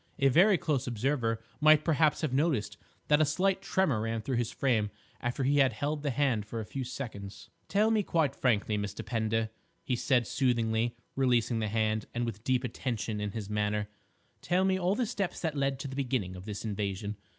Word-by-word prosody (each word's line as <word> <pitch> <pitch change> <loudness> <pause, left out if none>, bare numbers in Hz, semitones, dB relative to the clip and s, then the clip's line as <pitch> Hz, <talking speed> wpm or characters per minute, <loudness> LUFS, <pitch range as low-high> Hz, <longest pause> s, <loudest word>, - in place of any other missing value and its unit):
A 140 - +4
very 185 +8 +5
close 150 -7 -1
observer 120 -1 0 0.2
might 155 0 +6
perhaps 155 -2 +3
have 155 -5 -1
noticed 130 -9 +1 0.3
that 150 +1 +4
a - - +7
slight 185 +6 +1
tremor 160 - +1
ran 115 0 -2
through 130 +2 -1
his 120 -1 -1
frame 115 -7 +1 0.3
after 120 +3 -2
he 140 +2 +3
had 135 -2 +4
held 150 +1 -2
the 145 - -1
hand 130 -5 +1
for 110 +2 -6
a 110 - -4
few 135 +5 -4
seconds. 110 -6 -7 0.2
"Tell 210 +6 +3
me 220 -1 +3
quite 160 -7 +1
frankly, 105 -4 +1
Mr. 105 0 -5
Pender," 110 -1 0 0.3
he 125 - 0
said 120 0 +2
soothingly, 115 -2 +1 0.2
releasing 120 -3 +2
the 110 - -1
hand, 110 0 0
and 120 0 0
with 110 -2 -5
deep 130 0 +1
attention 115 -3 -3
in 105 -1 -3
his 110 -3 -5
manner, 105 0 -1 0.5
"tell 185 +2 +2
me 190 0 +3
all 185 +2 +1
the 245 - 0
steps 200 -5 -3
that 160 -3 -1
led 135 -1 0
to 140 +2 -5
the 135 - -7
beginning 125 -9 -1
of 90 +1 -9
this 105 0 -5
invasion. 100 0 -3
125 Hz, 200 wpm, -30 LUFS, 110-145 Hz, 0.5 s, a